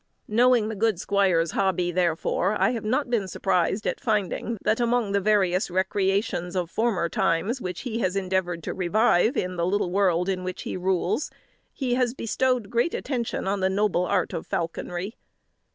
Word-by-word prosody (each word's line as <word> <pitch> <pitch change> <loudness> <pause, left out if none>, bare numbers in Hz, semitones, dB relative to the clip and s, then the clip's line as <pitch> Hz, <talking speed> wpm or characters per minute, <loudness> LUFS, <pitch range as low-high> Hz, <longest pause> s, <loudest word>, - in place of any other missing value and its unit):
'" - - -47
Knowing 240 0 +4
the 220 - -4
good 215 -3 +1
squire's 185 -5 +2
hobby, 185 -2 0
therefore, 180 +3 0
I - - +3
have 230 -3 -4
not 250 +4 0
been 215 -5 +1
surprised 190 +2 0
at - - -1
finding 220 -1 -1
that, 215 +2 +1
among 240 -3 +1
the 200 0 +1
various 190 -3 +2
recreations 190 0 0
of 180 -2 -2
former 220 -7 +1
times 195 +10 0
which 180 -1 -4
he 235 -3 -3
has 185 -4 0
endeavoured 185 -3 -1
to - - -3
revive 210 +4 +2
in 180 0 -2
the 170 - +1
little 185 -2 0
world 180 -2 +2
in 185 -1 -1
which 185 0 -5
he - - -4
rules, 185 - 0 0.4
he 255 -3 -2
has 250 0 +1
bestowed 250 -2 0
great 240 +8 +1
attention 240 -7 -3
on 200 +1 0
the 190 0 +2
noble 190 -2 +1
art 185 -4 0
of 165 - -5
falconry. 175 +5 -4
195 Hz, 180 wpm, -25 LUFS, 180-225 Hz, 0.4 s, Knowing